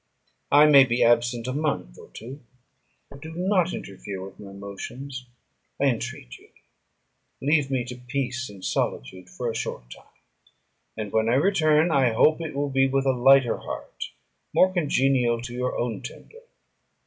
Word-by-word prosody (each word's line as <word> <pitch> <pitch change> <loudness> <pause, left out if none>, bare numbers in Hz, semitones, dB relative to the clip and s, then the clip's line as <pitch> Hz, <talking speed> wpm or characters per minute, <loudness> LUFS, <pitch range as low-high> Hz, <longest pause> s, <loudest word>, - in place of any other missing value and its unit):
I 145 +1 +7
may 140 -3 +8
be 125 -2 +1
absent 120 0 +2
a 130 - -3
month 140 - -2
or - - -14
two; 130 +6 -10 0.7
but 140 - -12
do 160 +1 -8
not 185 0 +1
interfere 95 0 -7
with 95 - -13
my 100 -2 -10
motions, 125 +7 -8 0.5
I - - 0
entreat - - -5
you: - - -21 0.9
leave 145 0 +2
me 130 -3 -1
to 125 0 -8
peace 125 0 -3
and 100 -2 -10
solitude 90 +9 -3
for 125 +5 -5
a 115 - -1
short - - -5
time; - - -13 0.9
and 105 -2 -5
when 110 0 +1
I 120 - +3
return, 155 0 +3
I 135 -5 +3
hope 155 +8 +3
it 160 -3 -5
will 140 0 -1
be 135 0 +3
with 135 0 0
a 135 - +4
lighter 130 0 +4
heart, - - -7 0.5
more 185 0 +4
congenial 135 -7 +2
to 120 0 -7
your 125 +1 -2
own 115 -4 -2
temper." 465 - -12
130 Hz, 165 wpm, -25 LUFS, 115-145 Hz, 0.9 s, may